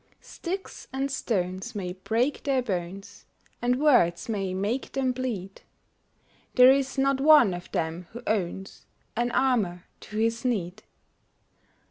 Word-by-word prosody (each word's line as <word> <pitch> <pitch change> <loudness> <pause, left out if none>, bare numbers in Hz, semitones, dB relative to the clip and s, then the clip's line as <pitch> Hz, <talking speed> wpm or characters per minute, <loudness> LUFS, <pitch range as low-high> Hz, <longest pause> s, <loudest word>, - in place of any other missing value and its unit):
Sticks 380 +2 -6
and 270 +1 -2
stones 185 -8 -2
may 180 -3 -3
break 230 +9 -1
their 270 -3 +1
bones, 190 -2 -5 0.3
And 245 +1 +1
words 245 - +3
may 200 -4 -2
make 205 +8 -2
them 265 -1 +1
bleed; 230 -7 -4 0.9
There 250 0 +9
is 275 0 0
not 270 0 +2
one 290 -9 +7
of 175 0 -8
them 165 +2 -3
who 240 +2 -9
owns 190 -2 -3 0.3
An 240 +2 0
armor 220 -10 +1 0.2
to 210 - -8
his 230 +2 0
need. 210 -6 -2
225 Hz, 130 wpm, -27 LUFS, 185-260 Hz, 0.9 s, There